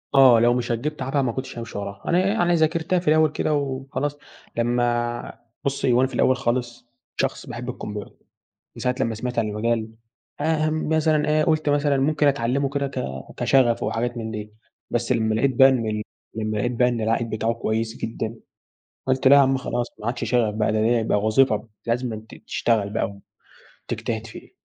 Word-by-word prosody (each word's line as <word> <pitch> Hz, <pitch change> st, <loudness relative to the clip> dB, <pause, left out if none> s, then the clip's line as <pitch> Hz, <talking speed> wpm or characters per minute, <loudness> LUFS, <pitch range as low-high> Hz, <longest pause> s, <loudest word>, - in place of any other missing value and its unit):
آه، 130 Hz, -4 st, +8 dB
لو 120 Hz, +1 st, +4 dB
مش 125 Hz, -1 st, -1 dB
هتجيب 145 Hz, +6 st, -2 dB
تعبها 135 Hz, +2 st, 0 dB
ما 125 Hz, -3 st, 0 dB
كنتش 130 Hz, +1 st, -6 dB
هامشي 115 Hz, -2 st, -6 dB
وراها. 100 Hz, -1 st, -6 dB
أنا 175 Hz, -, +3 dB
يعني 185 Hz, -2 st, +2 dB
ذاكرتها 165 Hz, +2 st, +2 dB
في 175 Hz, -, -10 dB
الأوّل 155 Hz, 0 st, +4 dB
كده 155 Hz, -, -1 dB
وخلاص 140 Hz, +1 st, -2 dB, 0.4 s
لمّا 120 Hz, 0 st, 0 dB, 0.3 s
بُصّي 140 Hz, -2 st, +1 dB
هو 120 Hz, -, +4 dB
أنا 130 Hz, -, +3 dB
في -, -, -13 dB
الأوّل 130 Hz, -, +3 dB
خالص 120 Hz, -2 st, -2 dB, 0.3 s
شخص -, -, -2 dB
باحب -, -, -6 dB
الكمبيوتر، 105 Hz, -1 st, -6 dB, 0.6 s
من -, -, -7 dB
ساعة 125 Hz, -, +1 dB
لمّا 115 Hz, -3 st, 0 dB
سمعت 125 Hz, +3 st, -4 dB
عن 110 Hz, -2 st, +1 dB
المجال 110 Hz, +1 st, -1 dB, 0.5 s
آآ، 155 Hz, 0 st, +1 dB
مثلًا 155 Hz, -1 st, +1 dB
إيه 155 Hz, 0 st, +3 dB
قلت 155 Hz, -1 st, +1 dB
مثلًا 145 Hz, -1 st, +2 dB
ممكن 145 Hz, +2 st, +2 dB
أتعلمه 140 Hz, 0 st, +1 dB
كده 140 Hz, 0 st, -1 dB
ك 135 Hz, -1 st, -4 dB, 0.4 s
كشغف 125 Hz, -4 st, +3 dB
وحاجات 115 Hz, +3 st, -1 dB
من 110 Hz, -1 st, -4 dB
دي، 105 Hz, -1 st, -6 dB, 0.4 s
بس 120 Hz, +1 st, 0 dB
لمّا 110 Hz, -2 st, +1 dB
لاقيت 130 Hz, +4 st, +1 dB
بقى 135 Hz, +1 st, +8 dB
إن 125 Hz, -4 st, +1 dB
ال 105 Hz, 0 st, -2 dB, 0.3 s
لمّا 110 Hz, -1 st, -2 dB
لاقيت 120 Hz, +4 st, 0 dB
بقى 125 Hz, +1 st, +3 dB
إن 120 Hz, -2 st, -2 dB
العائد 115 Hz, +1 st, 0 dB
بتاعه 110 Hz, +1 st, 0 dB
كويّس 115 Hz, 0 st, -2 dB
جدًا 115 Hz, 0 st, -4 dB, 0.7 s
قلت 130 Hz, 0 st, +3 dB
لا 140 Hz, -, +8 dB
يا -, -, +8 dB
عم 135 Hz, -1 st, +3 dB
خلاص 120 Hz, -2 st, -2 dB
ما 105 Hz, -, -6 dB
عادش 120 Hz, +1 st, -2 dB
شغف 115 Hz, -4 st, +1 dB
بقى 105 Hz, 0 st, +1 dB
ده، 110 Hz, -, +1 dB
ده 110 Hz, -, +2 dB
ديّة 120 Hz, 0 st, +3 dB
بقى 110 Hz, -, +1 dB
وظيفة 110 Hz, -1 st, +2 dB, 0.2 s
لازمًا 115 Hz, -2 st, -2 dB, 0.2 s
تشتغل 110 Hz, -4 st, +1 dB
بقى 100 Hz, -1 st, -2 dB, 0.7 s
وتجتهد 110 Hz, -1 st, -3 dB
فيه. 110 Hz, -, -12 dB
120 Hz, 190 wpm, -23 LUFS, 115-140 Hz, 0.7 s, آه